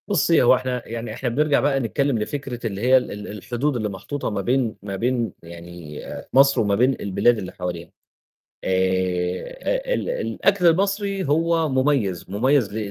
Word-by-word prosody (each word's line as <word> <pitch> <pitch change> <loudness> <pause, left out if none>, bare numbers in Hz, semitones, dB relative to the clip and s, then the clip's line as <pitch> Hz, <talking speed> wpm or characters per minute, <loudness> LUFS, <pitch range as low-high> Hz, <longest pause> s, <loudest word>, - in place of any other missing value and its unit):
بُصّي، 170 -4 +3
هو 125 - +6
إحنا 125 -1 -3
يعني 115 -1 -5
إحنا 125 +2 -2
بنرجع 145 +4 +2
بقى 140 -1 +1
نتكلّم 135 +2 0
لفكرة 125 +1 -4
اللي 100 -2 -5
هي 130 +2 +5
ال 105 -5 -4
الحدود 120 +7 -2
اللي 110 -3 -1
محطوطة 100 +9 -4
ما 105 -2 -2
بين 120 +1 0
ما 100 0 -5
بين 120 0 -1
يعني 85 -2 -10 0.3
مصر 135 +1 +5
وما 100 -2 +1
بين 130 +5 +3
البلاد 105 +4 +2
اللي 95 -4 -6
حواليها 85 -2 -6 0.7
آآ، 95 - -1
أ - - +3
ال - - -2
الأكل 200 - +1
المصري 195 +2 +1
هو 165 +1 +2
مُميز، 130 - 0
مٌميز 120 +2 +2
ل - - -4
120 Hz, 165 wpm, -22 LUFS, 100-145 Hz, 0.7 s, هو